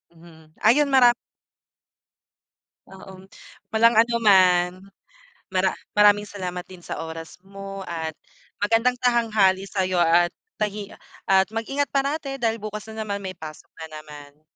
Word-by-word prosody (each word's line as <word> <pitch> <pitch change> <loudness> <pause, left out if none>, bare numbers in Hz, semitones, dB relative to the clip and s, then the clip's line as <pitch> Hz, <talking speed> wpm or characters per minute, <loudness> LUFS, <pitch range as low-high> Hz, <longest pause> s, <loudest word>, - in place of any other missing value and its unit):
Mhm 160 -2 -18
ayun 280 +6 +4
maram 245 -3 +6 1.8
Oo, 190 0 -13 0.4
walang 230 +1 +4
ano 230 +2 +3
man, 180 -3 +5 0.8
mara 190 0 +1 0.2
maraming 205 0 +6
salamat 180 -3 -5
din 185 - -12
sa - - -5
oras 165 0 -8
mo 195 0 -9
at 160 -2 -5 0.5
magandang 230 +4 +2
tahanghali 215 -6 +2
sa'yo 185 -2 -1
at 175 +1 +4 0.3
tahi 210 -1 -4 0.3
at 190 0 +3
mag-ingat 255 +5 -2
parati 275 0 -2
dahil 225 -2 -1
bukas 215 0 -6
na 220 - -4
naman 200 -2 -3
may 190 -2 -6
pasok 155 -2 -10 0.2
na - - -5
naman. 150 -1 -13
195 Hz, 130 wpm, -23 LUFS, 180-225 Hz, 1.8 s, maram